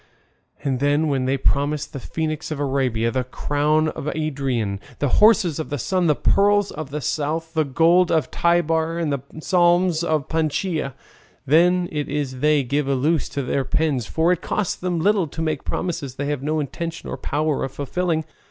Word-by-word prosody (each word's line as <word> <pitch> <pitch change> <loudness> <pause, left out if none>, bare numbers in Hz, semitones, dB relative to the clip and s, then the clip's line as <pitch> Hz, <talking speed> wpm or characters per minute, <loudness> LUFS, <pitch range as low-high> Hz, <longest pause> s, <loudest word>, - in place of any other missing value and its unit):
And 135 -3 0
then 145 +3 +2
when 135 -2 0
they 135 +1 +1
promise 145 +2 0
the 140 - -8
Phoenix 155 +3 -3
of 155 -2 -4
Arabia, 130 -5 0
the 130 0 0
crown 150 +4 0
of 150 - -6
Ariadne, 135 -10 -2 0.2
the 145 - 0
horses 210 -8 +5
of 160 - -4
the 145 - -2
Sun, 180 +7 0
the 150 - +4
pearls 205 +3 +3
of 150 -2 -6
the 150 +2 -4
South, 160 +4 -2
the 160 -1 +2
gold 165 +6 +3
of 155 -6 +1
Tibar, 165 -1 +1
and 160 -4 -1
the 140 - -1
balsam 175 +5 +2 0.2
of 155 -2 0
Panchaia! 160 -2 -1 0.5
Then 175 +5 +4
it 150 -1 -3
is 140 -3 -3
they 150 0 +3
give 140 +3 -1
a 140 - +1
loose 150 +4 +1
to 140 - -3
their 135 +2 0
pens, 135 -3 0
for 165 +2 +2
it 180 -1 0
costs 210 -4 -1
them 180 -2 -2
little 195 0 +2
to 150 - -10
make 155 -3 -1
promises 165 -8 -3
they 145 - -3
have 145 -3 -2
no 155 +2 -1
intention 165 +4 -5
or - - -4
power 155 -1 -1
of 135 - -3
fulfilling. 160 +3 -2
155 Hz, 190 wpm, -22 LUFS, 140-165 Hz, 0.5 s, horses